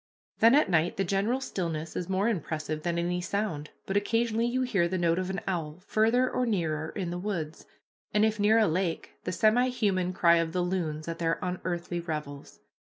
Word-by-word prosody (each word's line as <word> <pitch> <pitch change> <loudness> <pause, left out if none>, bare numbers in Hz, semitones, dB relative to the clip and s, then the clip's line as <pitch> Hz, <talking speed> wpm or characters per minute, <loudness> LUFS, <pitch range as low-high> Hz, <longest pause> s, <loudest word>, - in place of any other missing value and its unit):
Then 230 +4 +7
at 295 - +4
night 170 -1 +1
the 195 - +1
general 200 +7 0
stillness 165 -10 -4
is 180 0 -3
more 190 +3 +1
impressive 155 -6 -2
than 170 +1 -1
any 175 +1 -1
sound, 175 -6 -2 0.2
but 195 - -3
occasionally 230 +2 +1
you 255 +2 0
hear 200 -9 +1
the 185 +2 -2
note 170 0 +2
of 185 0 -2
an 190 0 -3
owl 165 -5 -3
farther 230 +4 +3
or 250 -1 -1
nearer 160 -7 -1
in 185 -4 -4
the 175 - -3
woods, 170 -6 -4 0.4
and 210 +1 +3
if 220 -1 0
near 210 +2 +4
a 225 - +5
lake, 170 0 -1
the 180 - -1
semihuman 215 -4 +2
cry 170 -2 +5
of 165 -1 -1
the 180 - +1
loons 165 -4 -2
at 165 0 -4
their 165 -1 +1
unearthly 175 -1 -3
revels. 150 -4 -6
180 Hz, 195 wpm, -28 LUFS, 165-215 Hz, 0.4 s, Then